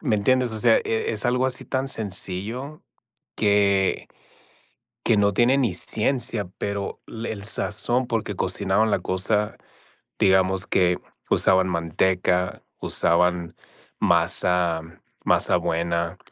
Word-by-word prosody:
¿me 120 -9 +1
entiendes? 125 +3 +2
O 110 - -3
sea, 115 0 +5
eh, 110 - -2
es 110 0 -2
algo 125 +1 +2
así 125 -1 -5
tan 135 0 -2
sencillo 110 +6 -5 0.5
que 100 -2 +2 1.0
que 115 - +4
no 100 0 +3
tiene 120 +6 +4
ni 120 -8 +1
ciencia, 115 -2 -2
pero 100 -1 -3
el 110 -3 -5
sazón, 120 +4 -1
porque 110 -4 -2
cocinaban 100 +4 +1
la - - +2
cosa, 105 +3 -1 0.6
digamos 95 0 +3
que 90 -1 +2 0.3
usaban 95 0 +3
manteca, 90 +2 0 0.2
usaban 85 0 +1 0.5
masa, 85 -2 +2 0.4
masa - - +3
buena 85 0 -1
100 Hz, 115 wpm, -24 LUFS, 90-115 Hz, 1.0 s, sea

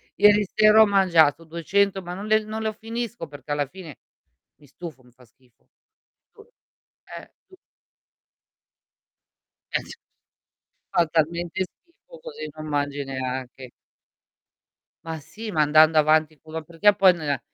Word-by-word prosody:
Ieri 205 0 +5
sera 215 0 +6
ho - - +8
mangiato 165 -5 +3
200, 195 +4 0
ma 175 +1 -7
non 200 +2 -7
le 215 0 +3
non 220 +1 -5
lo 220 0 -2
finisco 225 -4 -6
perché 145 0 -11
alla 145 -1 -1
fine 165 - -12 0.6
mi 145 -1 -21
stufo, 150 -4 -11
mi 125 - -22
fa 125 +1 -22
schifo 120 +1 -33 0.6
tu 430 - -17 0.8
eh, - - -15
tu 375 0 -19 2.2
Eh - - +1
cer 470 - -11 0.9
fa 180 -3 +3
talmente 170 +2 -1
schifo 360 - -17
così 470 -1 -7
non 155 0 -9
mangi 145 -1 -2
neanche. 130 -1 -6 1.4
Ma 160 -1 -5
sì, 215 +9 -9
ma 155 -3 +1
andando 155 +1 +5
avanti 155 0 +2
puro 160 +1 -8
perché 170 +6 +2
poi 190 -2 +6
nella 145 -6 -3
165 Hz, 135 wpm, -24 LUFS, 145-210 Hz, 2.2 s, ho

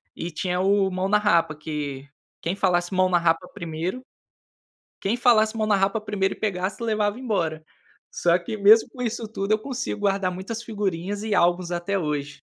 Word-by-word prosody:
E 170 - -4
tinha 180 +3 -2
o 195 0 +3
"Mão 185 +1 -1
na 210 - +5
Rapa", 170 -7 +2
que 145 -3 -5 0.3
quem 175 +4 -2
falasse 180 -1 +1
"Mão 185 0 +3
na 175 - +4
Rapa" 170 +1 +1
1º, 170 +5 -4 1.0
quem 215 +5 0
falasse 225 -3 +4
"Mão 215 -1 0
na 205 - +4
Rapa" 195 +3 +1
1º 205 -2 -1
e - - -17
pegasse, 190 -1 -2
levava 215 0 0
embora. 165 -10 -1 0.5
Só 170 0 +2
que, 185 +5 -6
mesmo 215 +2 +6
com 250 - -9
isso 230 -1 -2
tudo, 205 -1 -3
eu 215 - +2
consigo 250 -4 -4
guardar 195 -2 +1
muitas 195 +6 -5
figurinhas 200 -2 -3
e 215 -2 0
álbuns 175 0 +2
até 175 +3 -1
hoje. 145 -2 -3
195 Hz, 180 wpm, -24 LUFS, 175-215 Hz, 1.0 s, mesmo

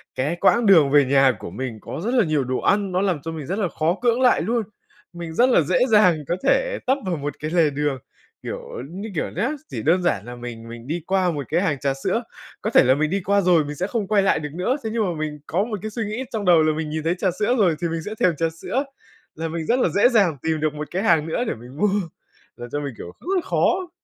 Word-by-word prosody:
cái 145 +6 -1
quãng 220 +6 +3
đường 160 -8 +6
về 145 -1 +5
nhà 135 0 +4
của - - -7
mình 120 -4 -5
có - - -6
rất 240 - 0
là 240 -6 +4
nhiều 155 -3 +1
đồ 130 0 -2
ăn, 200 -1 +1
nó 185 +1 +1
làm 180 -7 0
cho 165 +3 -5
mình 155 -4 -6
rất 195 +7 -3
là 190 - +1
khó 165 +3 0
cưỡng 240 0 +2
lại 250 - +4
luôn. 230 +6 0 0.5
Mình 170 -2 -7
rất 245 +9 +4
là 240 - +5
dễ 170 +4 +1
dàng 210 -7 +5
có 175 - 0
thể - - +1
tấp 265 - +4
vào 180 -2 -1
một 145 0 -4
cái 155 +1 -4
lề 165 -3 +3
đường. 145 -1 -1 0.5
Kiểu - - -5 0.3
như 195 +6 -6
kiểu - - -1
nhá, 215 +9 -1 0.2
chỉ - - -5
đơn 175 +4 +3
giản 105 - 0
là 120 0 -8
mình 120 -2 -8
mình 115 +2 -10
đi 165 +2 -3
qua 185 -2 +2
một 145 -4 -4
cái 170 +3 +1
hàng 145 -8 0
trà 140 -1 0
sữa, 180 - -2 0.4
có 215 - -1
thể - - +6
là 130 +1 +4
mình 155 +1 0
đi 195 +2 -1
qua 200 +1 +3
rồi 175 -5 +3
mình 150 - -6
sẽ 185 +6 -2
không 220 -4 -2
quay 205 -1 +3
lại 195 - +2
được 150 -1 -5
nữa. 185 - 0
Thế 220 - -2
nhưng 230 -1 +1
mà 180 - -1
mình 150 -1 -4
có 185 +5 +1
một 215 -3 -4
cái 215 - -5
suy 230 +1 -3
nghĩ 215 +5 -4
trong 215 -4 -3
đầu 170 -3 +6
là 155 0 +2
mình 155 0 -3
nhìn 155 0 -3
thấy 165 +3 +1
trà 185 -1 +1
sữa 215 +4 +2
rồi 175 -6 +3
thì 170 - +1
mình 165 0 -3
sẽ 215 +1 -5
thèm 175 -3 +3
trà 165 0 +1
sữa, 165 - -3 0.5
là 165 +1 -3
mình 160 0 -4
rất 245 +2 +2
là 180 - +2
dễ 205 +9 +4
dàng 195 - +3
tìm 160 -1 -1
được 155 -1 0
một 150 0 -6
cái 185 +3 -2
hàng 165 -6 +3
nữa 165 +9 -1
để - - 0
mình 120 +4 -13
mua. 210 +5 +2 0.7
Làm 120 0 -8
cho 145 - -2
mình, 140 -2 -5
kiểu, 85 - -8
cứ 375 +2 0
khó 365 -1 +1
170 Hz, 280 wpm, -22 LUFS, 150-205 Hz, 0.7 s, đường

